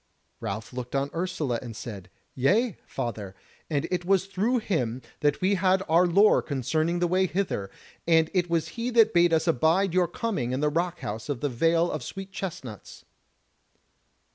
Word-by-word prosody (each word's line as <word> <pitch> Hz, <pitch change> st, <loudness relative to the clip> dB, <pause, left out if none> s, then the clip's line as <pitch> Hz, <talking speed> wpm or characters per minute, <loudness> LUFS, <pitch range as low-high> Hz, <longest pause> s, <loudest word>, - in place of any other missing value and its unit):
Ralph 110 Hz, +5 st, -5 dB
looked 125 Hz, +1 st, -5 dB
on 140 Hz, +1 st, 0 dB
Ursula 165 Hz, -8 st, -2 dB
and 120 Hz, -3 st, -8 dB
said: 100 Hz, -6 st, -8 dB, 0.2 s
"Yea, 205 Hz, -, +2 dB
father, 105 Hz, -5 st, -5 dB, 0.3 s
and 150 Hz, 0 st, -1 dB
it 180 Hz, -1 st, -1 dB
was 190 Hz, +1 st, +2 dB
through 200 Hz, +6 st, 0 dB
him 130 Hz, -, -2 dB, 0.2 s
that 145 Hz, -1 st, +1 dB
we 190 Hz, +2 st, +3 dB
had 190 Hz, 0 st, +2 dB
our 170 Hz, +3 st, +4 dB
lore 200 Hz, +5 st, +5 dB
concerning 155 Hz, +5 st, -1 dB
the 175 Hz, 0 st, +1 dB
way 185 Hz, +2 st, +2 dB
hither; 175 Hz, -, -2 dB, 0.4 s
and 160 Hz, -1 st, +4 dB
it 175 Hz, -2 st, +1 dB
was 165 Hz, -2 st, 0 dB
he 235 Hz, +1 st, -3 dB
that 225 Hz, -2 st, +4 dB
bade 175 Hz, 0 st, +4 dB
us 160 Hz, +1 st, +2 dB
abide 165 Hz, +5 st, +2 dB
your 180 Hz, -1 st, +3 dB
coming 155 Hz, -, -2 dB
in 130 Hz, -, -1 dB
the 150 Hz, +1 st, +2 dB
rock 175 Hz, +3 st, -2 dB
house 110 Hz, +5 st, -5 dB
of 140 Hz, -5 st, -3 dB
the 145 Hz, -, 0 dB
Vale 165 Hz, +7 st, +2 dB
of 155 Hz, -, -3 dB
Sweet 195 Hz, +7 st, -7 dB
chestnuts." 165 Hz, -, -7 dB
165 Hz, 175 wpm, -26 LUFS, 130-185 Hz, 0.4 s, lore